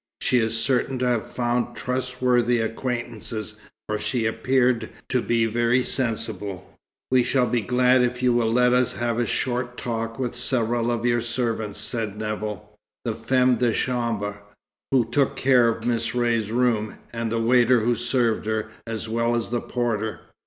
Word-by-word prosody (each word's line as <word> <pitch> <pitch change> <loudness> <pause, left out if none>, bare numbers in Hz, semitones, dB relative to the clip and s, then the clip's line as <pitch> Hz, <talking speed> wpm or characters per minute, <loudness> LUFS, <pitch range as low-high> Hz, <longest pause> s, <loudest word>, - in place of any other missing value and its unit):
She 125 - +2
is 115 0 0
certain 130 +1 0
to 125 - 0
have 120 -3 +1
found 120 0 -1
trustworthy 125 -1 +1
acquaintances, 115 -2 -4 0.3
for 105 0 -2
she 120 -1 -1
appeared 120 0 +1 0.2
to 125 - +1
be 115 -1 +1
very 120 +3 +2
sensible." 110 -7 -3 0.4
"We 130 -1 +5
shall 125 +1 +2
be 120 0 0
glad 125 +3 +3
if 125 +1 -1
you 125 -1 +4
will 115 -2 +2
let 125 +1 +4
us 125 -1 +2
have 120 -1 -1
a 120 - +1
short 125 -1 -2
talk 115 -1 -3
with 125 -2 -2
several 120 -1 0
of 120 0 -1
your 120 -1 +2
servants," 115 -3 -2
said 110 -4 -3
Nevill 105 -1 -4 0.4
"the 115 - 0
femme 125 +2 +2
de 120 -2 +2
chambre 115 -5 -1 0.5
who 130 -3 +3
took 135 +3 +1
care 130 -3 +4
of 115 0 -3
Miss 115 0 0
Ray's 115 -3 +1
room, 115 -3 +1 0.2
and 115 -1 -2
the 115 - 0
waiter 120 +1 +4
who 120 +2 +2
served 120 -2 0
her, 110 0 -2 0.2
as 115 0 -4
well 115 +1 +1
as 115 -1 -2
the 120 0 -1
porter." 110 -3 -2
120 Hz, 165 wpm, -24 LUFS, 115-125 Hz, 0.5 s, We